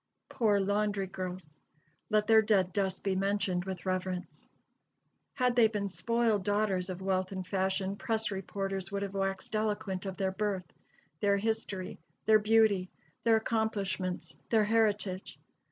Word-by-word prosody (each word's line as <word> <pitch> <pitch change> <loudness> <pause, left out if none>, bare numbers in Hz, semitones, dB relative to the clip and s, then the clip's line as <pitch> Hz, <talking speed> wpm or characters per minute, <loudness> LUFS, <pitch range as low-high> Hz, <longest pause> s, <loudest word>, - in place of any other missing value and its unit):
Poor 210 -4 +2
laundry 205 0 +1
girls! 185 -4 -7 0.5
Let 215 -1 +3
their 220 0 +6
dead 195 -4 +2
dust 190 -1 -1
be 195 -1 +1
mentioned 195 -2 0
with 190 -1 -5
reverence. 185 -1 -3 0.9
Had 250 -1 +2
they 235 -2 +6
been 205 -2 -2
spoiled 230 0 +1
daughters 205 -2 0
of 185 0 -5
wealth 185 0 0
and 190 -1 -4
fashion, 190 +1 -1
press 220 0 -1
reporters 195 0 -3
would 200 0 -2
have 200 -1 -4
waxed 195 +1 -2
eloquent 210 -3 -1
of 190 - -5
their 190 -1 0
birth, 195 -2 -2 0.5
their 200 +1 +3
history, 205 -3 -2 0.3
their 215 -1 +6
beauty, 210 -3 +3 0.4
their 230 -1 +6
accomplishments, 210 -5 -1
their 220 -2 +4
heritage. 210 -3 0
200 Hz, 140 wpm, -31 LUFS, 190-215 Hz, 0.9 s, their